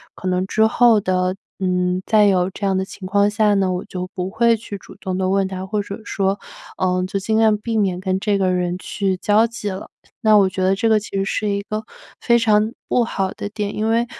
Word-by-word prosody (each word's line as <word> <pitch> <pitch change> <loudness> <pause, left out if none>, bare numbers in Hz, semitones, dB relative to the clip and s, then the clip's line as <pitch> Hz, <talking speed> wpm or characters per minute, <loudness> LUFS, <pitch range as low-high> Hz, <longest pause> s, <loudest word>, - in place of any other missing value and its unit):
可 185 - -6
能 185 +1 0
之 220 +2 +3
后 230 -1 +4
的， 185 -1 0 0.2
嗯， 180 0 0
再 215 -2 +5
有 185 -2 +3
这 200 +1 -5
样 195 - +1
的 190 - 0
情 190 -1 -9
况 200 +1 +3
下 210 0 +2
呢， 190 -2 +1
我 180 - -3
就 185 0 -6
不 185 0 -3
会 230 +1 +3
去 210 -2 -7
主 - - -14
动 185 -1 -4
地 185 0 0
问 195 0 +2
他， 190 0 -5
或 205 +2 -1
者 200 +2 -7
说， 195 -2 -1 0.4
呃， 185 0 +1
就 195 - -3
尽 220 +3 0
量 220 -1 +4
避 225 +1 -3
免 185 -4 +1
跟 190 0 -1
这 205 -1 +1
个 185 -1 +1
人 180 0 -1
去 195 -1 -2
交 210 +4 +3
际 225 -3 -5
了。 190 - -7 0.3
那 215 -1 +5
我 195 -2 +4
觉 185 - -4
得 190 +1 +3
这 225 +3 +1
个 220 -1 +4
其 205 - -9
实 195 - +1
是 210 +1 -1
一 200 0 -1
个 215 +2 -4 0.4
非 235 -1 +3
常 215 0 +2 0.2
不 245 - +3
好 195 -4 -2
的 - - -5
点， 210 -1 -4
因 215 +1 0
为， 230 +1 +2
200 Hz, 260 characters per minute, -20 LUFS, 185-215 Hz, 0.4 s, 再